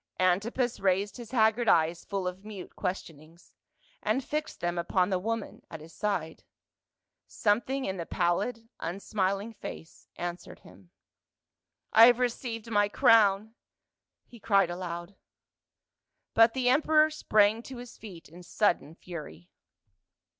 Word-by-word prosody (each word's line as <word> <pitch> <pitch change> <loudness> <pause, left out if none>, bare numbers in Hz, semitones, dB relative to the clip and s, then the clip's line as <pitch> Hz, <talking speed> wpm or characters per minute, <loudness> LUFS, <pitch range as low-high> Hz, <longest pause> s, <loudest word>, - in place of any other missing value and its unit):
Antipas 215 +7 +1
raised 195 +1 0
his 235 -3 -9
haggard 225 -1 +2
eyes 165 +1 +2
full 195 -2 -3
of 180 +2 -6
mute 205 -3 -9
ques 185 +1 -2
tionings, 160 +2 -17 0.5
and 265 - 0
fixed 305 +3 -4
them 175 0 -2
upon 180 +2 +1
the 185 - +1
woman 225 +2 -4
at 160 - -8
his 160 +2 -13
side. 190 -7 -3 0.8
Something 245 +6 0
in 190 0 -3
the 170 - -5
pallid 215 +7 -1
unsmiling 195 +4 -2
face 165 -5 -10
answered 175 0 -6
him. 180 - -18 1.0
"I 225 +1 +9
have 245 -1 +5
received 235 -2 -3
my 205 -1 +3
crown 210 0 +4 0.4
!" - - -62
he 235 - -13
cried 195 -5 +2
aloud. 175 +1 -6 1.2
Rut 225 +1 +5
the 255 -1 0
emperor 310 +3 +4
sprang 215 -6 +2
to 260 +1 -10
his 245 -1 -10
feet 185 -7 -11
in 175 +3 -13
sudden 175 -3 0
fur\ 155 - -9
200 Hz, 135 wpm, -29 LUFS, 175-230 Hz, 1.2 s, I